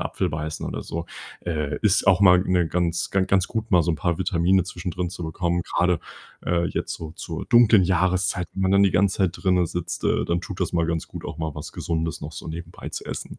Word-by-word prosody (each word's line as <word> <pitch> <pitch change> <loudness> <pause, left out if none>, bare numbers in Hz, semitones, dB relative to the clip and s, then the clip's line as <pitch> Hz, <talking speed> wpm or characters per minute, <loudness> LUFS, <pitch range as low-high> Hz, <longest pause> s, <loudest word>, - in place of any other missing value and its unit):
Apfel - - -1
beißen 80 +1 -4
oder - - -4
so. 85 +1 -5 0.4
Äh, 75 -3 -2
ist 105 -2 +4
auch 95 -1 +5
mal, 90 -2 +7
ne, 90 -2 +1
ganz 85 0 -1
ga 95 - +2
ganz 95 0 +2
gut, 110 -1 -4
mal 90 -3 +6
so 85 - 0
'n - - 0
paar 85 +1 -1
Vitamine 90 +1 +2
zwischendrin 90 0 -4
zu 90 0 -7
bekommen, 85 +2 -1
grade, 90 -1 +1 0.4
äh, 85 0 +1
jetzt - - -2
so 80 -1 -8
zur 80 -1 -6
dunklen 115 -5 +6
Jahreszeit, 90 0 +1
wenn 95 - -2
man 95 0 +2
dann 100 0 +5
die 100 - +5
ganze 100 0 +2
Zeit 95 -3 +1
drinnen 90 -2 +2
sitzt, 85 +1 -4
äh, - - +1
dann 85 0 0
tut 95 +1 -7
das 90 - -1
mal 85 -1 +2
ganz 80 -1 -2
gut, - - -9
auch - - -6
mal 80 -2 -3
was 75 - -7
Gesundes 80 -1 -3
noch 75 +1 -7
so - - -8
nebenbei 85 +1 -7
zu - - -6
essen. - - -6
90 Hz, 235 wpm, -24 LUFS, 85-95 Hz, 0.4 s, mal